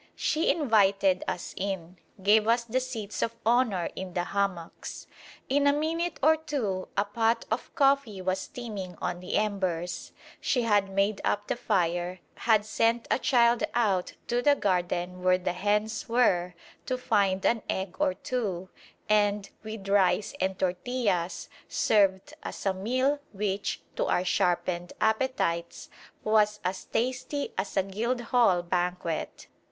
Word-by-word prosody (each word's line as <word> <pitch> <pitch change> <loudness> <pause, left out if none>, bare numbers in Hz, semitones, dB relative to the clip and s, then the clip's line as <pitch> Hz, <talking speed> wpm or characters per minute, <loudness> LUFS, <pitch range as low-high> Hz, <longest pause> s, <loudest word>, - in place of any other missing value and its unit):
She 315 +2 +1
invited 200 - +3
us 175 - -4
in, 185 -2 -4 0.2
gave 210 +2 +5
us 235 +1 +3
the 235 +2 0
seats 230 -5 -5
of 230 - -1
honour 225 -7 +2
in 185 -1 -6
the 175 - +1
hammocks. 190 -3 -3 0.4
In 285 +1 +3
a 285 - +5
minute 325 +3 -1
or 315 +2 +6
two 245 -12 -3
a 200 - +3
pot 225 +2 +1
of 225 - -2
coffee 275 - +2
was 185 0 -1
steaming 200 -7 -6
on 175 0 -2
the 180 - -4
embers, 185 -5 -1 0.3
she 250 -3 +1
had 205 -3 +2
made 195 +1 0
up 205 - 0
the - - -1
fire, 180 -5 0
had 220 -3 +2
sent 230 +2 +1
a - - +3
child 235 -2 +3
out 200 -6 +1
to 240 0 0
the 285 +3 +5
garden 180 -3 -1
where 185 0 +4
the 180 -1 -2
hens 210 +4 -1
were 180 -7 +2 0.3
to 255 - 0
find 200 -6 +1
an 230 -2 +3
egg 190 -1 -2
or 185 - +2
two, 195 -5 -3 0.4
and 205 -1 +2
with 215 -2 -7
rice 200 0 +2
and 190 0 0
tortillas 185 -1 -1 0.2
served 195 -3 +2
us - - -7
a 195 - +2
meal 255 +9 0
which, 200 0 -2
to - - 0
our 180 - +1
sharpened 175 -1 0
appetites, 220 -7 0 0.3
was 210 -1 +3
as 185 +1 -3
tasty 260 +4 -2
as 190 +1 -3
a 195 - +4
Guildhall 230 -1 +1
banquet. 175 -2 -2
205 Hz, 145 wpm, -28 LUFS, 185-235 Hz, 0.4 s, or